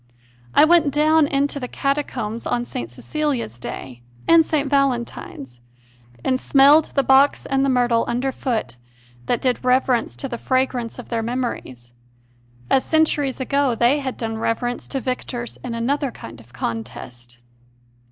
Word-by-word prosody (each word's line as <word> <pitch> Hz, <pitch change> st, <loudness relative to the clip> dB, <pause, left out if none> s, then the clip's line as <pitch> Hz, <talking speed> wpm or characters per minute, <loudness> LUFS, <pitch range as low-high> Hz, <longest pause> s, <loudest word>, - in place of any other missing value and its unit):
I -, -, +8 dB
went 320 Hz, -3 st, +4 dB
down 305 Hz, +1 st, +3 dB
into 280 Hz, 0 st, 0 dB
the 250 Hz, -, -4 dB
Catacombs 255 Hz, -6 st, -2 dB
on 240 Hz, 0 st, -1 dB
St. 120 Hz, -, -6 dB
Cecilia 290 Hz, -, -2 dB
s 120 Hz, +2 st, -11 dB
Day 120 Hz, 0 st, -7 dB, 0.3 s
and 330 Hz, -1 st, +7 dB
St. 300 Hz, -2 st, -1 dB
Valentine 265 Hz, -, -1 dB
s, 120 Hz, -2 st, -16 dB, 0.7 s
and 255 Hz, 0 st, +1 dB
smelled 285 Hz, +4 st, +5 dB
the 275 Hz, -, +3 dB
box 270 Hz, +2 st, +4 dB
and 270 Hz, 0 st, +1 dB
the 275 Hz, -, +2 dB
myrtle 245 Hz, -2 st, +2 dB
underfoot 240 Hz, -, -2 dB, 0.5 s
that 245 Hz, -, 0 dB
did 255 Hz, -1 st, 0 dB
reverence 250 Hz, -2 st, +1 dB
to 275 Hz, -, -5 dB
the 240 Hz, -3 st, -6 dB
fragrance 255 Hz, -3 st, -1 dB
of 250 Hz, -, -10 dB
their 230 Hz, -1 st, -1 dB
memories, 225 Hz, -, -4 dB, 0.7 s
as 265 Hz, -, +3 dB
centuries 300 Hz, -4 st, +1 dB
ago 275 Hz, -1 st, +1 dB
they 240 Hz, +6 st, +3 dB
had 265 Hz, -2 st, -4 dB
done 225 Hz, -1 st, -3 dB
reverence 240 Hz, +2 st, -2 dB
to 270 Hz, -, -2 dB
victors 250 Hz, -1 st, -4 dB
in 240 Hz, -2 st, -4 dB
another 275 Hz, +4 st, 0 dB
kind 115 Hz, -, -11 dB
of 115 Hz, +1 st, -18 dB
contest. 120 Hz, +1 st, -6 dB
255 Hz, 150 wpm, -21 LUFS, 230-275 Hz, 0.7 s, I